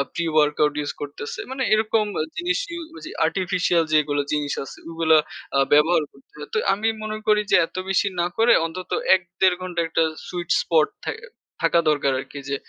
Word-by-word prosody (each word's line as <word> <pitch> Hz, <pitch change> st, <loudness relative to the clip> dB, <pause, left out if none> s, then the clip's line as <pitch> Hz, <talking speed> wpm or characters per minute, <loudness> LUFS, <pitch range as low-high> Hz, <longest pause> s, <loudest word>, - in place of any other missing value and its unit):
Pre-workout 150 Hz, -2 st, +2 dB
use 145 Hz, -, -3 dB
করতেছে। 145 Hz, 0 st, -6 dB
মানে 265 Hz, 0 st, -2 dB
এরকম 215 Hz, 0 st, +2 dB, 0.3 s
জিনিস 355 Hz, +2 st, 0 dB
ইউ 340 Hz, 0 st, -5 dB, 0.2 s
যে -, -, -7 dB
আর্টিফিশিয়াল 180 Hz, -2 st, +1 dB
যেগুলো 145 Hz, -1 st, +2 dB
জিনিস 145 Hz, -2 st, -1 dB
আছে -, -, -10 dB
ওগুলো 160 Hz, -1 st, +3 dB, 0.4 s
আ -, -, +4 dB
ব্যবহার 155 Hz, +2 st, +4 dB
করতে 135 Hz, -, -24 dB
হয়। 150 Hz, -, -9 dB
তো -, -, +1 dB, 0.2 s
আমি 215 Hz, +3 st, -1 dB, 0.2 s
মনে 215 Hz, 0 st, -4 dB
করি 210 Hz, 0 st, +4 dB
যে -, -, +7 dB
এত -, -, -22 dB
বেশি 195 Hz, +1 st, +2 dB
না -, -, +1 dB
করে 230 Hz, +1 st, +5 dB
অন্তত 180 Hz, +2 st, -7 dB, 0.2 s
১, 185 Hz, -, -2 dB, 0.2 s
১.৫ 185 Hz, -1 st, +5 dB
ঘন্টার 175 Hz, -2 st, -2 dB
একটা 165 Hz, 0 st, +2 dB, 0.2 s
সুইট 175 Hz, -1 st, -5 dB
স্পট 160 Hz, -2 st, +3 dB, 0.2 s
থা -, -, -1 dB, 0.5 s
থাকা 170 Hz, -, +4 dB
দরকার 145 Hz, -2 st, +2 dB
আরকি 140 Hz, -, -8 dB
যে 140 Hz, -, 0 dB
170 Hz, 180 wpm, -23 LUFS, 150-195 Hz, 0.5 s, যে